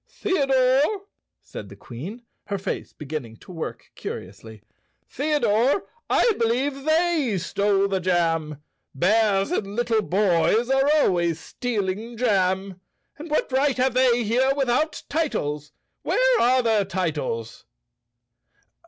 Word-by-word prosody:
"Theodore," 275 +1 +1 0.4
said 100 - -9
the 100 - -11
Queen, 155 - -9 0.2
her 200 - -2
face 190 +1 -4
beginning 135 -7 -7
to - - -14
work 165 -3 -7
curiously, 100 +3 -8 0.4
"Theodore, 280 - +1 0.3
I 475 - +4
believe 265 +4 0
they 315 - +2
stole 200 +2 +1
the 195 -1 -1
jam. 165 -5 0 0.3
Bears 200 - +2
and 200 - -2
little 235 -2 +1
boys 205 +5 +2
are 270 +1 +3
always 170 - +2
stealing 220 +1 -4
jam. 190 -4 0 0.4
And 315 +2 -8
what 300 - 0
right 270 +1 +2
have 255 0 +2
they 245 -2 +3
here 255 +5 +2
without 275 +3 0
titles? 150 - -2 0.3
Where - - +2
are 255 +1 +4
their 220 -3 +2
titles?" 155 - -3
215 Hz, 120 wpm, -24 LUFS, 175-265 Hz, 0.4 s, I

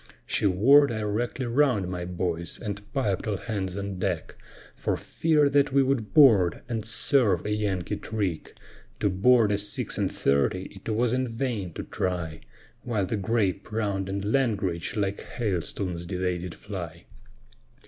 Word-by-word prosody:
She - - +1
wore 135 +10 +6
directly 115 +3 -2
round, 120 -6 +2
my 90 -1 -4
boys, 85 -1 -3
and 105 -2 -4
piped 105 -9 -1
all 105 -2 0
hands 95 -5 -3
on 100 -2 -4
deck, 90 -4 -2 0.4
For - - -2
fear 155 -3 +2
that 140 0 +3
we 135 0 +4
would 130 -6 -1
board 110 - +5
and 115 -2 -2
serve 115 - +2
a 105 - -1
Yankee 100 -4 -1
trick; 100 -7 -3 0.4
To 100 - +1
board 110 +3 +4
a 100 - +1
six 105 0 -4
and - - 0
thirty 90 +8 0
it - - -5
was 115 +2 +1
in 130 0 0
vain 115 -6 -3
to - - -5
try, 85 -4 -3 0.4
While 110 -5 -1
the 110 - -2
grape, 105 -1 -1
round, 100 -3 -1
and 100 +1 -3
langrage, 100 -10 0
like 100 -2 -1
hailstones 90 -4 -3
they 90 -1 -1
did 90 -1 -6
fly. 85 -5 -7
100 Hz, 155 wpm, -27 LUFS, 90-115 Hz, 0.4 s, wore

